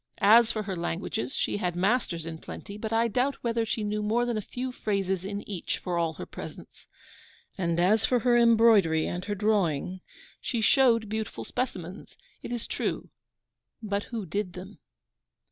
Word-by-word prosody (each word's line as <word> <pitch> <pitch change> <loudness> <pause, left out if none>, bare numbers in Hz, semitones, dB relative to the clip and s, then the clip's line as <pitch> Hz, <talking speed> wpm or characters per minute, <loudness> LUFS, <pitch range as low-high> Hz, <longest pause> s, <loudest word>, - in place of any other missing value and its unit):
As 225 +3 +7
for 215 - -2
her 195 -2 -4
languages, 170 - -3
she - - 0
had 180 -4 -1
masters 185 -3 0
in 165 -1 -6
plenty, 200 - -8
but 215 +1 -5
I 225 +1 +3
doubt 250 +5 +1
whether 230 -1 0
she 220 -1 -1
knew 210 0 -1
more 225 +3 +1
than 240 -1 -1
a 215 - -1
few 250 +5 -5
phrases 195 -6 -1
in 200 +1 -5
each, 190 -5 -3
for 180 -2 -3
all 165 -1 0
her - - -7
presence; - - -10 0.7
and 170 -3 0
as 205 +5 +4
for 245 -2 +2
her 245 -1 +4
embroidery 225 -9 +5
and 175 +1 -3
her 205 - -2
drawing, 185 -4 0 0.4
she 235 - -2
showed 230 -1 +4
beautiful 220 +1 -4
specimens, 190 -7 -5 0.2
it - - -7
is 240 -2 -2
true, - - -3 0.7
but 200 -1 -1
WHO 225 -4 -5
DID 185 +1 -3
THEM? 185 +3 -10
210 Hz, 175 wpm, -28 LUFS, 180-230 Hz, 0.7 s, As